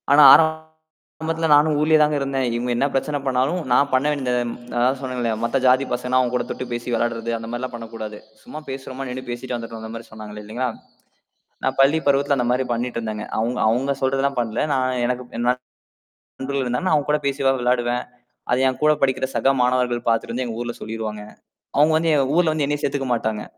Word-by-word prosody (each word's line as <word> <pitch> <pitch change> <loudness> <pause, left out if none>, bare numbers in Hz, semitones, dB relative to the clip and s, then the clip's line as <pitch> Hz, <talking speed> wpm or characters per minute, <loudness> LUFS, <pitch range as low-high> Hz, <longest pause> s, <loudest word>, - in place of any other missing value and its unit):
ஆனா, 145 +1 +8
ஆரம்பத்துல 160 0 -1
நானும் 150 +1 +4
ஊர்லயே 155 +1 +4
தான் 150 0 +1
இருந்தேன். 135 -1 -1
இவுங்க 120 +1 -1
என்ன 135 - +2
பிரச்சனை 145 +2 0
பண்ணாலும், 135 +6 +1
நான் 140 +3 +4
பண்ண 130 +2 +3
வேண்டியத 130 -4 -1 0.4
அதான் 130 +2 +2
சொன்னேன்ல்ல, 125 -3 -2
மத்த 120 +3 +1
ஜாதி 130 +2 +4
பசங்கன்னா, 125 +1 +1
அவுங்க 125 -1 0
கூடத் 125 - -2
தொட்டு 130 - -4
பேசி 120 +1 -5
விளையாடுறது. 115 0 -1
அந்தமாரில்லாம் 120 +3 -5
பண்ணக் 115 -1 -9
கூடாது. 110 -1 -6 0.2
சும்மா 155 - -8
பேசுறமா 135 0 -6
நின்னு 130 +1 -5
பேசிட்டு 120 +1 -4
வந்துர்ணும். 115 -1 -7
அந்தமாரி 115 +1 -8
சொன்னாங்க. 105 -1 -9
இல்லேங்களா! 120 +5 -3 1.0
நான் - - 0
பள்ளிப் 145 +4 +3
பருவத்தில 140 +1 +3
அந்தமாரி 125 +1 +1
பண்ணிட்டு 120 +1 -2
இருந்தேங்க. 110 -1 -4
அவுங்க, 120 +3 -1
அவுங்க 130 +5 +1
சொல்றதெல்லாம் 135 0 +1
பண்ணல. 115 -1 -2
நான், 130 -1 0
எனக்கு 125 +1 -2
என் 120 - -1 0.7
நண்பர்கள் 135 0 -4
இருந்தாங்க. 125 +10 -1
அவுங்க 145 -1 0
கூட 150 - +3
பேசிவேன், 135 -1 +1
விளையாடுவேன். 120 0 0 0.5
அதை 125 - +2
என் 130 - -3
கூடப் 150 0 +3
படிக்கிற 130 -1 +2
சக 135 +4 +3
மாணவர்கள் 125 -1 +1
பாத்துட்டு 115 -1 +1
வந்து, 130 +1 -1
எங்க 115 -2 -5
ஊர்ல 120 0 -4
சொல்லிருவாங்க. 110 -1 -5 0.5
அவுங்க 150 +2 +5
வந்து 165 0 +1
எங்க 140 -2 +3
ஊர்ல 170 -3 +3
வந்து 155 -2 0
என்னைய 145 0 -1
சேத்துக்க 140 -1 -1
மாட்டாங்க. 110 -2 -2
130 Hz, 185 wpm, -22 LUFS, 120-140 Hz, 1.0 s, ஆனா